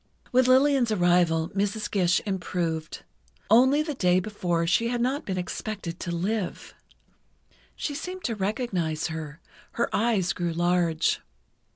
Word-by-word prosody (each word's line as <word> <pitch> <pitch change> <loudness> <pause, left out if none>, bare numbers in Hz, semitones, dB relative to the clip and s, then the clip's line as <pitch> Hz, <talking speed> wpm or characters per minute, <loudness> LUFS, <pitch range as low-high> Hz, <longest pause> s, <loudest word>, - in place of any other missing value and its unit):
With 255 0 +4
Lillian's 260 -2 +4
arrival 175 -4 +2
Mrs. 205 +2 -1
Gish 180 -3 +2
improved. 170 -5 -3 0.5
Only 260 +6 +5
the 305 -1 -3
day 180 -8 +3
before 180 -4 -1
she 180 +8 +2
had 240 0 -1
not 260 +4 -1
been 190 -2 -2
expected 180 -1 -5
to - - -5
live. 190 +3 -3 1.0
She 290 - -3
seemed 365 +5 -6
to 235 - -1
recognize 190 -7 -2
her—her 160 +8 -5
eyes 210 -5 +1
grew 175 -2 -2
large. 175 -1 +1
190 Hz, 130 wpm, -26 LUFS, 170-235 Hz, 1.0 s, Only